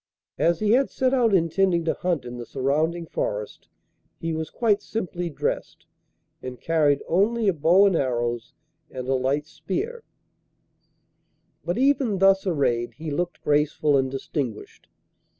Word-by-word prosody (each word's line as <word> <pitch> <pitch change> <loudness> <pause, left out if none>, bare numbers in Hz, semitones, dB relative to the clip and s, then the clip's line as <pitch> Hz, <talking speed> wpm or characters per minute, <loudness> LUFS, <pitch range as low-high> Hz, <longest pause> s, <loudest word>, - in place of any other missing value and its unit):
As 170 +2 +2
he 210 -1 +2
had 260 +3 +3
set 260 0 0
out 240 -4 +3
intending 170 -1 +2
to 160 - +1
hunt 175 -8 -2
in 120 0 -7
the 120 - -6
surrounding 160 +6 0
forest 105 -8 -4 0.5
he 165 0 -3
was 160 0 -3
quite 210 -3 +1
simply 180 -5 -4
dressed, 150 - -4 0.6
and 125 -1 -7
carried 150 -4 +2
only 215 +5 +2
a 195 - +4
bow 170 +6 +4
and 195 -3 +3
arrows 120 -4 -1 0.3
and 130 -1 -7
a 135 - +1
light 135 +3 0
spear; 405 - -4 1.6
but 175 +1 -2
even 265 -5 +2
thus 195 +1 +4
arrayed 120 -8 0
he 155 0 -6
looked 175 +4 -3
graceful 150 0 +2
and 135 -1 +2
distinguished. 135 -3 -5
165 Hz, 145 wpm, -24 LUFS, 135-195 Hz, 1.6 s, a